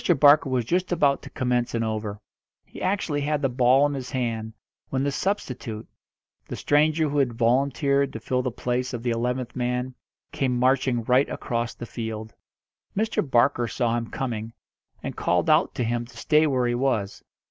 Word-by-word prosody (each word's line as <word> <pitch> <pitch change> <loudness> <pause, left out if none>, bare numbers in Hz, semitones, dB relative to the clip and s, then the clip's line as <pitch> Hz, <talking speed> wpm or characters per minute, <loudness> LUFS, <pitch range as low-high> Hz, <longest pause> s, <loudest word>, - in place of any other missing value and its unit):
Barker 145 -1 +6
was 125 -3 0
just 180 +8 0
about 145 -5 +2
to - - -10
commence 125 -2 -1
an 115 - 0
over. 110 -2 -3 0.5
He - - -11
actually 185 -6 0
had 150 0 -1
the 135 - +3
ball 125 +2 +4
in 145 - 0
his 130 -3 -5
hand, 115 -4 -2 0.4
when 135 0 -1
the 140 - 0
substitute 125 - -3 0.6
the - - -5
stranger 155 +2 +2
who 145 0 0
had 130 -4 +1
volunteered 140 +4 +2
to 110 - -5
fill 125 +3 -1
the 125 - -1
place 125 +2 -2
of 120 - -6
the 120 - 0
eleventh 125 +1 -2
man 125 +1 -2 0.4
came 130 -3 0
marching 130 -1 +2
right 125 +4 +3
across 115 -1 -3
the 120 - -7
field. 110 -2 -6 0.6
Mr. 220 +2 +1
Barker 120 -3 +2
saw 120 -1 0
him 115 -1 -3
coming, 115 -3 -4 0.5
and - - -4
called - - +1
out - - +3
to - - -1
him 120 +1 -1
to 115 -1 -16
stay 155 +6 +3
where 130 -3 +1
he 120 - +1
was. 120 -6 -1
125 Hz, 180 wpm, -25 LUFS, 120-140 Hz, 0.6 s, Barker